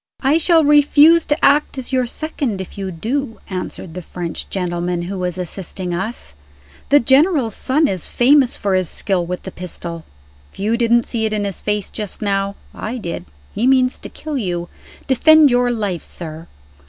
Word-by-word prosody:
"I 285 +4 +3
shall 330 -1 +4
refuse 295 +3 +5
to 295 +1 +1
act 285 0 +3
as 260 0 -6
your 255 -1 +2
second 275 -7 -3
if 190 - -7
you 195 -1 -4
do," 225 - -3
answered 185 -2 -5
the 180 - -6
French 170 0 -5
gentleman 175 -1 -2
who 190 +2 -5
was 180 -1 -2
assisting 180 0 -5
us. 190 - -4 0.6
"The 290 - +6
General's 270 - +3
son 295 +8 +1
is 185 - -2
famous 260 +1 +3
for 200 -1 -1
his 185 -2 +1
skill 190 -3 0
with 180 +1 -5
the 190 - -7
pistol. 170 -2 -6 0.5
If - - -21
you 215 +4 0
didn't 235 0 +3
see 225 -2 -2
it 215 - -3
in 210 -1 -1
his 200 -2 -4
face 210 -1 -2
just 210 -3 -5
now, 200 -1 -1 0.2
I 235 +4 -5
did 175 -7 -5 0.3
he 235 +4 0
means 260 -1 +3
to - - -8
kill 300 -3 -5
you. 175 -5 -3 0.4
Defend 300 +2 +6
your 245 0 +3
life, 205 -7 -2
sir!" 160 -1 -8
215 Hz, 180 wpm, -19 LUFS, 180-270 Hz, 0.6 s, The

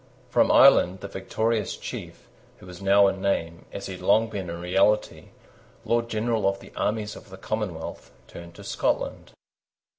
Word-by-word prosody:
From - - +4
Ireland 95 +2 +6
the 100 - -5
victorious 110 +2 -2
chief, - - -8 0.3
who - - -15
was 90 0 -11
now 100 +1 +5
in 95 -1 0
name, 85 -4 -1
as 100 - -6
he 95 - -5
had 90 - -10
long 110 +4 +3
been 95 -4 -5
in 85 0 -5
reality, 95 +4 +1 0.6
Lord 115 0 0
General 110 -2 +1
of 100 0 -4
the - - -15
armies 105 0 -2
of - - -13
the 95 - -10
Commonwealth, 95 -5 -5 0.2
turned 85 0 -11
to - - -11
Scotland. - - -2
100 Hz, 170 wpm, -25 LUFS, 90-105 Hz, 0.6 s, Ireland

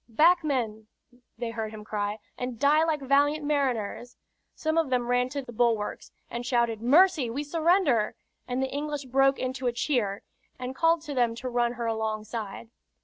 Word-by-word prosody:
"Back, 335 +9 +4
men!" 225 -7 -2 0.5
they 235 -1 -3
heard 220 -1 -3
him 215 -1 -9
cry, 205 -1 -2 0.2
"and 250 -1 -4
die 290 +5 +4
like 315 -3 0
valiant 290 +3 +2
mariners." 245 -5 -1 0.4
Some 315 0 -1
of 325 -4 +2
them 250 -2 +1
ran 245 +1 +1
to 280 +1 -4
the 240 - -10
bulwarks, 225 -2 0 0.2
and 240 +1 -5
shouted 235 -3 0
"Mercy! 300 +1 +4
We 275 +6 -3
surrender!" 315 - +2 0.3
and 255 +1 -1
the 265 - -3
English 295 -1 -3
broke 270 +2 +3
into 255 0 -3
a - - +2
cheer 235 -6 -1 0.3
and 255 +1 -5
called 330 +1 +3
to 295 -2 -5
them 240 -3 +1
to 255 +2 -5
run 240 -1 +1
her 240 -1 -4
alongside. 220 0 -4
250 Hz, 175 wpm, -27 LUFS, 230-290 Hz, 0.5 s, Back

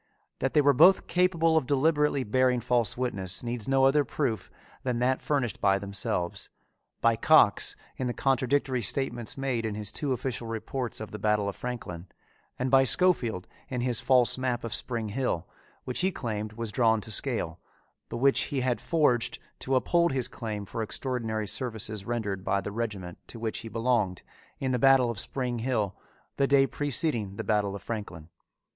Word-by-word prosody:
That 135 +3 -1
they 150 - +6
were 145 0 +5
both 175 +8 +6
capable 170 -3 +2
of 145 -6 0
deliberately 145 0 +2
bearing 125 +2 +2
false 120 -1 0
witness 95 -8 -2
needs 120 -2 -3
no 135 0 +4
other 145 +2 +4
proof 130 -4 -2 0.3
than 125 -2 -1
that 130 +2 +1
furnished 135 -6 -1
by 100 -1 +4
themselves 100 -3 -3 0.5
by 115 0 +4
Cox 115 -3 +4 0.2
in 130 - -2
the - - 0
contradictory 135 -1 +1
statements 120 +3 -1
made 130 -4 -1
in 110 -2 -3
his 105 -1 -5
two 140 +5 -2
official 125 -2 -3
reports 115 +2 -4
of 110 - -7
the 105 - -7
Battle 105 -1 +1
of 100 - -3
Franklin, 100 -8 -6 0.5
and 130 0 -1
by 135 0 +6
Scofield 130 - +3 0.2
in 125 -2 -2
his 120 -2 0
false 130 -1 +3
map 125 -2 -1
of 115 - -4
Spring 115 -4 -2
Hill, 100 -7 -2 0.4
which 125 - -3
he 190 +1 +2
claimed 110 - -4
was 115 -1 -4
drawn 115 -2 +3
to 110 - -7
scale, 105 -9 0 0.5
but - - -4
which 135 +3 +4
he 135 -2 -2
had 125 -1 0
forged 145 -8 +1 0.2
to 135 - 0
uphold 170 +4 +2
his 130 -3 +1
claim 105 -4 -5
for 115 - -5
extraordinary 110 -1 -2
services 110 -2 -4
rendered 105 -5 -3
by 100 - +1
the 100 +1 -5
regiment 100 -6 -4
to - - -9
which 110 -1 -3
he 115 -1 -8
belonged 115 -5 0 0.4
in 130 -1 -1
the 125 - 0
Battle 135 -2 +5
of 110 - -2
Spring 125 -1 -2
Hill 110 -5 -1 0.4
the 140 - +3
day 140 -1 +5
preceding 135 - -1
the 110 - -4
Battle 105 -1 0
of 100 - -9
Franklin. 95 -9 -6
120 Hz, 180 wpm, -28 LUFS, 105-135 Hz, 0.5 s, they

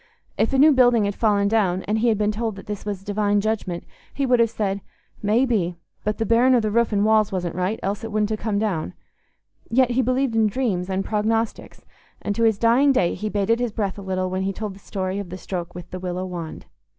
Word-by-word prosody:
If - - +1
a 270 - +1
new 300 +3 +7
building 245 -5 +4
had 200 - -1
fallen 205 -2 +2
down 195 -4 +1
and 215 +2 0
he 240 - +2
had 220 -2 +3
been 210 0 +1
told 220 0 -3
that 195 - -11
this 210 0 -6
was 200 -2 -4
a - - -23
divine 205 0 +1
judgment, 200 -5 -2 0.3
he 280 - -1
would 250 -2 +3
have 230 -1 +4
said, 200 -3 -2 0.4
"May 220 +5 +3
be; 190 -8 0 0.3
but 210 0 -1
the 225 - -1
bearing 245 +3 +4
o' - - +5
the 215 -2 -1
roof 235 +1 +2
and 205 0 +2
walls 215 -1 +3
wasn't 180 -3 -2
right, 185 +5 -1
else 200 +3 -2
it 225 - -5
wouldn't 210 0 0
ha' 215 - -2
come 210 -2 -1
down"; 185 - -2 0.7
yet 250 +1 +3
he 250 +2 +2
believed 255 -1 0
in 220 -1 +4
dreams 200 -6 -1
and 190 0 -1
prognostics, 225 +1 -2 0.3
and 205 - -2
to 230 - -2
his 220 -3 +3
dying 240 +6 +4
day 180 -10 +2
he 215 - -4
bated 210 +3 +1
his 245 -2 -1
breath 205 -2 -3
a - - -7
little 185 -1 -2
when 185 0 -1
he 195 +1 0
told 210 0 -5
the 195 - -14
story 190 -1 -3
of 200 -3 -6
the 185 - -6
stroke 180 -2 -5
with 175 -1 -9
the 185 - -5
willow 180 0 -3
wand. 175 -3 -7
210 Hz, 245 wpm, -23 LUFS, 190-230 Hz, 0.7 s, new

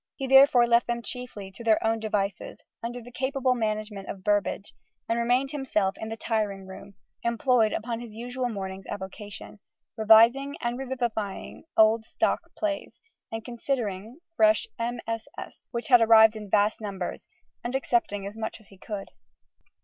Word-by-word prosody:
He 270 - -4
therefore 270 -2 +7
left 235 0 +3
them 235 0 -2
chiefly 235 -7 -7
to 215 +5 -11
their 220 -1 +3
own 225 0 +1
devices, 205 -3 -3 0.2
under 240 +1 -5
the 245 - -12
capable 260 0 0
management 215 -3 -3
of 190 - -7
Burbage, 205 0 0 0.3
and 230 +1 0
remained 250 +3 +1
himself 215 -9 0
in 220 - -5
the 225 - -5
tiring 210 -4 -2
room, 200 +1 -11 0.3
employed 235 -1 +2
upon 230 +1 -3
his 235 -3 -9
usual 245 +2 -3
morning's 195 -3 -6
avocation, 205 +2 -8 0.4
revising 230 +6 +5
and 240 +1 -2
revivifying 240 -7 -4
old 220 +1 +5
"stock" - - -1
plays, 310 -2 -3 0.3
and 225 0 -5
considering 235 - -3 0.2
fresh 325 +5 +4
MSS., 230 -1 -5
which 235 +2 -5
arrived 225 -2 +7
in 210 -2 -8
vast 210 +2 +2
numbers 195 -4 -5 0.4
and 245 +2 -3
accepting 235 -6 0
as 200 +2 -6
much 220 0 -5
as 215 - -21
he 195 - -17
could. 205 -1 -6
225 Hz, 150 wpm, -27 LUFS, 210-245 Hz, 0.4 s, therefore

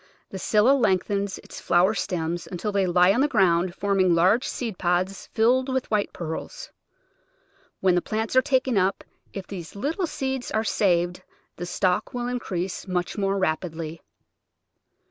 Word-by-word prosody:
The 190 - -6
Scilla 215 +6 +3
lengthens 200 -5 +1
its - - -10
flower 180 +4 +3
stems 170 -4 -3
until 190 +4 -3
they 200 -2 +1
lie 180 +2 +5
on 245 - +1
the 290 - +4
ground, 175 -7 +2
forming 195 -3 +2
large 190 +9 +3
seed 225 -7 -4
pods 180 +2 -1
filled 250 +4 +2
with 260 -2 -2
white 210 -2 +1
pearls. 170 - -6 1.1
When 185 -1 +4
the 175 - +2
plants 220 +4 -3
are 260 - +7
taken 260 -5 +1
up, 190 +2 0 0.3
if 195 -2 -6
these 180 -3 -8
little 320 - -2
seeds 265 -4 -3
are 220 - 0
saved 180 -5 +1 0.4
the 175 - -5
stock 180 +5 0
will 245 0 -2
increase 195 -7 -3
much 180 -1 -2
more 195 -1 0
rap 160 -3 0
idly. 160 -1 -6
195 Hz, 160 wpm, -25 LUFS, 180-225 Hz, 1.1 s, are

